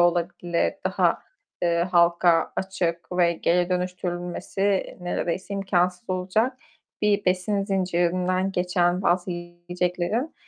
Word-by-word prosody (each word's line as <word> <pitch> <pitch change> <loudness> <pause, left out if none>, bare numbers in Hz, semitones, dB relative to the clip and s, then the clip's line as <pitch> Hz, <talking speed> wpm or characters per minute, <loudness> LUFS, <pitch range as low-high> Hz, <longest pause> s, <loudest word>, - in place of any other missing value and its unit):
olabilir, 175 0 +1
daha, - - +1 0.4
eee, 170 0 +2
halka 170 -1 +4
açık 175 -3 -2
ve 175 -1 +3
geri 175 +1 +1
dönüştürülmesi 180 +2 -2
neredeyse 180 +2 -3
imkânsız 185 0 0
olacak 205 +8 0 0.5
bir 205 -1 +2
besin 185 +2 +1
zincirinden 185 0 0
geçen 180 0 +1
bazı 180 0 +1
yiyeceklerin, 175 - -3
180 Hz, 95 wpm, -25 LUFS, 175-190 Hz, 0.5 s, halka